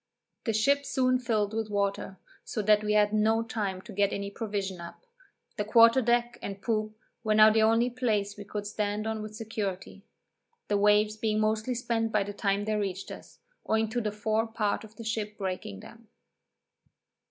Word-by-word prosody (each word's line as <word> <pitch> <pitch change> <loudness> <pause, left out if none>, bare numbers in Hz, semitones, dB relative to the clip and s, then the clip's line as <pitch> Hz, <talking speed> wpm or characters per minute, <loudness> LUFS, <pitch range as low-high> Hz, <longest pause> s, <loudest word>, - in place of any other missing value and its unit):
The 225 - 0
ship 280 +7 +2
soon 255 -2 +1
filled 220 -4 0
with 220 -1 -2
water, 200 -1 -2 0.3
so 215 - -3
that 210 +1 +4
we 210 0 0
had 210 0 +3
no 220 +1 +2
time 205 -5 -3
to - - -10
get 200 0 +2
any 200 0 -4
provision 200 -4 -4
up; 170 - -11 0.5
the 210 - 0
quarter 230 +4 +6
deck 240 0 +1
and 200 0 -6
poop 215 0 -2 0.3
were 215 -1 +2
now 215 0 +8
the 220 0 +3
only 230 +3 +3
place 215 -5 -1
we 205 - -8
could 205 +1 -5
stand 210 0 -2
on 220 -1 -2
with 215 0 -7
security, 205 -3 -5 0.7
the 205 - +2
waves 210 +1 +3
being 215 -1 0
mostly 215 +3 0
spent 230 -2 -1
by 210 -2 +2
the 205 +1 -6
time 200 0 0
they 215 - -1
reached 195 -2 -3
us, - - -12 0.3
owing 220 0 +1
to 240 +2 -1
the 215 -2 -2
fore 215 +2 0
part 215 -2 -1
of 220 0 -14
the 230 - -9
ship 215 -1 -3
breaking 185 - -4
them. 230 -1 -14
215 Hz, 185 wpm, -28 LUFS, 205-225 Hz, 0.7 s, now